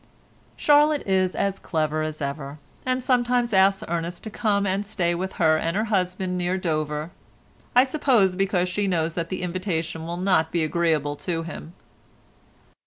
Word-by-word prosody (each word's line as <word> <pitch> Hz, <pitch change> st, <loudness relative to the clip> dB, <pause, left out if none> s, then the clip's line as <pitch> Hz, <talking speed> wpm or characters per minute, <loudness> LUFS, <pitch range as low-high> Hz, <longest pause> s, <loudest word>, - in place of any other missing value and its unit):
Charlotte 295 Hz, 0 st, +4 dB
is 190 Hz, -1 st, +1 dB
as 195 Hz, -1 st, -1 dB
clever 155 Hz, -2 st, -1 dB
as 155 Hz, -1 st, -3 dB
ever, 140 Hz, 0 st, -5 dB, 0.3 s
and 255 Hz, 0 st, 0 dB
sometimes 245 Hz, -2 st, +1 dB
asks 195 Hz, 0 st, +4 dB
Ernest 170 Hz, +1 st, -3 dB
to 220 Hz, -, -7 dB
come 205 Hz, -2 st, +1 dB
and 195 Hz, +1 st, 0 dB
stay 180 Hz, -4 st, -1 dB
with 185 Hz, +2 st, -3 dB
her 160 Hz, -2 st, +3 dB
and 165 Hz, +4 st, -1 dB
her 215 Hz, -, +1 dB
husband 185 Hz, -3 st, -1 dB
near 180 Hz, +1 st, 0 dB
Dover, 155 Hz, -2 st, -2 dB, 0.6 s
I 250 Hz, -, +8 dB
suppose 255 Hz, -9 st, +2 dB
because 190 Hz, -1 st, +1 dB
she 200 Hz, +3 st, -1 dB
knows 165 Hz, -3 st, 0 dB
that 165 Hz, -1 st, -3 dB
the 185 Hz, -1 st, -4 dB
invitation 170 Hz, -3 st, -3 dB
will 170 Hz, +1 st, -4 dB
not 180 Hz, -4 st, +2 dB
be 170 Hz, -2 st, +1 dB
agreeable 155 Hz, -3 st, 0 dB
to 165 Hz, +2 st, -3 dB
him. 165 Hz, 0 st, -8 dB
180 Hz, 165 wpm, -24 LUFS, 165-200 Hz, 0.6 s, I